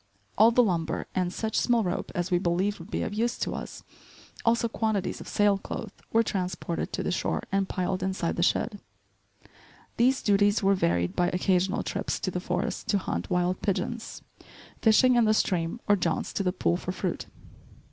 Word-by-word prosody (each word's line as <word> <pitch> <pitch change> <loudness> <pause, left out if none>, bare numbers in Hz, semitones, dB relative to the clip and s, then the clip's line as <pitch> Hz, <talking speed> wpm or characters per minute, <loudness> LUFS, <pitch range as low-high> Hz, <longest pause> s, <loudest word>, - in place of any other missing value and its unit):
All 220 +2 +7
the 245 +1 +4
lumber 170 -6 -1
and 180 -1 0
such 220 +3 -3
small 240 -2 +2
rope 180 -1 -3
as 175 +1 -2
we 175 - +3
believed 185 +3 0
would 170 +4 -11
be - - -2
of - - -3
use 230 +3 0
to - - -2
us, - - -7 0.6
also 235 0 +3
quantities 220 -4 -1
of - - -10
sail 205 -1 +2
cloth, 205 +1 -6 0.2
were 225 +1 +4
transported 180 -4 -3
to - - -2
the - - -1
shore - - -1
and 195 -1 +1
piled 185 0 -1
inside 190 -2 -1
the - - -1
shed. 205 +4 +1 1.2
These 255 +3 +3
duties 205 +1 +3
were 195 +1 +5
varied 85 - 0
by 175 - +2
occasional 185 +1 +1
trips - - -2
to - - -1
the - - -2
forest - - -3
to 205 - +2
hunt 90 - -3
wild 180 +1 0
pigeons, 225 +3 -3 0.6
fishing 245 +3 +5
in 235 - +5
the 215 0 +3
stream 175 +1 0
or 205 - +5
jaunts 170 -4 -1
to - - -1
the 185 -2 +1
pool 175 -1 0
for 180 - -4
fruit. 185 -1 -3
195 Hz, 185 wpm, -27 LUFS, 180-220 Hz, 1.2 s, All